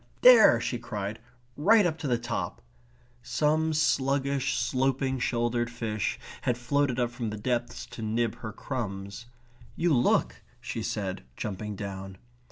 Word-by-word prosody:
There!" 235 - +8
she 120 0 -2
cried. 105 -2 -4 0.4
"Right 205 +7 +5
up 165 -2 -1
to 150 - -3
the 120 -2 +2
top!" 120 0 -4 0.6
Some 155 +5 +1
sluggish, 140 -2 +1
sloping 130 0 0
shouldered 120 0 0
fish 115 -4 -2 0.2
had 120 - 0
floated 130 +1 0
up 120 -1 +1
from 120 -2 -4
the 105 - -5
depths 120 +2 -2
to - - -8
nip 115 +1 0
her 110 - -6
crumbs. 100 -3 -5 0.5
"You 170 -1 +2
look," 125 -2 +2 0.2
she - - -5
said, 95 -3 -3 0.2
jumping 105 0 -4
down. 95 -1 -6
120 Hz, 140 wpm, -28 LUFS, 110-140 Hz, 0.6 s, There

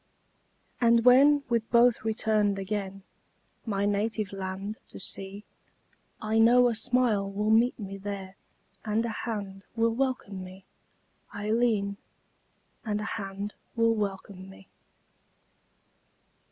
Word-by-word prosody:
And 235 0 +4
when, 280 +3 +6
with 230 -2 0
both 235 -1 +4
returned 215 -2 +1
again, 195 -1 -4 0.6
My 200 -2 0
native 205 0 -1
land 195 +2 -5
to - - -10
see, 195 +1 -5 0.8
I 215 +1 0
know 245 +2 +6
a - - 0
smile 225 -3 +1
will 210 +2 0
meet 235 +3 +4
me 195 -3 -7
there 195 -1 -6 0.5
And 220 +1 0
a - - -2 0.2
hand 195 -3 -5
will 230 0 +2
welcome 235 -7 -2
me, 185 +1 -12 0.7
Ailleen, 210 -1 0 0.9
And 210 -4 -1
a - - -4
hand 200 -1 -5 0.2
will 230 -1 +3
welcome 195 -2 -4
me! 195 0 -15
210 Hz, 115 wpm, -28 LUFS, 195-230 Hz, 0.9 s, when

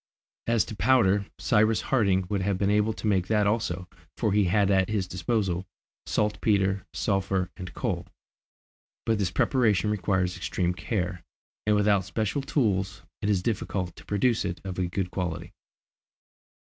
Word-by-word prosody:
As 115 -3 +3
to 110 - -7
powder, 100 -2 +3
Cyrus 110 0 +3
Harding 100 -8 +2
would 100 0 -1
have 100 0 0
been 100 +1 +1
able 105 +1 +3
to 110 - -8
make 95 -4 +2
that 105 -1 +2
also, 100 -4 -1 0.3
for 105 - +1
he 105 -1 +4
had 100 +2 +3
at 95 0 +3
his 100 -4 -1
disposal 95 0 -1 0.4
saltpetre, 100 -2 +1
sulphur, 95 -2 0
and 90 -1 -7
coal; 90 -8 -2 1.0
but 110 -2 +1
this 95 -3 +1
preparation 105 -2 +2
requires 95 -3 0
extreme 90 -1 -1
care, 90 -3 -3 0.4
and 105 - +4
without 105 -2 +3
special 110 +8 -2
tools 95 - 0 0.2
it 105 - 0
is 95 -3 +1
difficult 95 -5 -2
to 85 - -14
produce 110 +3 +1
it 90 -2 -3
of 95 -1 -5
a 90 - +1
good 90 +1 -3
quality. 90 -4 -4
100 Hz, 155 wpm, -27 LUFS, 90-105 Hz, 1.0 s, he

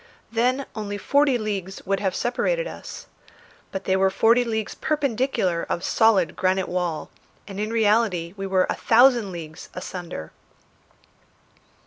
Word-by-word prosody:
Then 250 +4 +1
only 205 -2 -4
forty 280 +3 +3
leagues 195 -4 -4
would 195 0 0
have 190 -2 -1
separated - - 0
us! - - -8 0.7
But 190 0 -4
they 190 - +1
were 190 0 +3
forty 230 +5 +4
leagues 220 -2 -2
perpendicular 260 - 0
of 175 - -2
solid 220 -6 +3
granite 185 0 +1
wall, 175 -3 -2 0.4
and 195 -1 -7
in 210 +1 -1
reality 210 -6 +2
we 195 -1 -4
were 190 -1 +3
a - - 0
thousand 235 -3 +4
leagues 160 -1 -8
asunder! 175 - -6
205 Hz, 135 wpm, -24 LUFS, 185-235 Hz, 0.7 s, forty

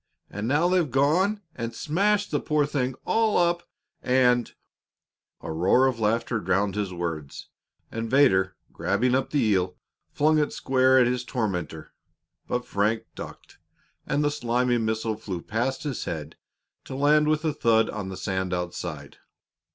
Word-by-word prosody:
And 105 +3 -4
now 150 +6 +3
they've 180 -4 +2
gone 180 - +2
and 115 -1 -5
smashed 200 - +1
the 145 - +1
poor 150 -1 +1
thing 130 -3 -2
all 220 -1 +2
up, 175 0 +2 0.4
and 125 -1 +3 0.5
" - - -50
A - - -5
roar 90 +11 +3
of 130 -3 0
laughter 115 +2 0
drowned 100 -1 0
his 105 -2 -2
words, 80 -5 -5 0.4
and 115 0 -4
Vedder, 95 -9 +4 0.2
grabbing 120 +6 0
up 130 0 +1
the 145 - 0
eel, 95 -4 +1 0.3
flung 155 +1 +3
it 150 - 0
square 130 0 +3
at 125 - +6
his 125 0 0
tormentor. 90 - -4 0.5
But 125 0 -2
Frank 110 +1 0
ducked, - - -10 0.5
and 145 - +1
the 145 - +2
slimy 120 -2 0
missile 110 0 -1
flew 100 -5 -5
past 120 +8 -2
his 145 -5 -3
head 75 -2 -5 0.5
to 130 - -7
land 150 +2 +4
with 155 +1 +1
a 155 - +1
thud 115 -5 +3
on 100 -3 -5
the 95 - -6
sand 95 -2 -2
outside. 85 -4 -5
120 Hz, 160 wpm, -26 LUFS, 100-145 Hz, 0.5 s, at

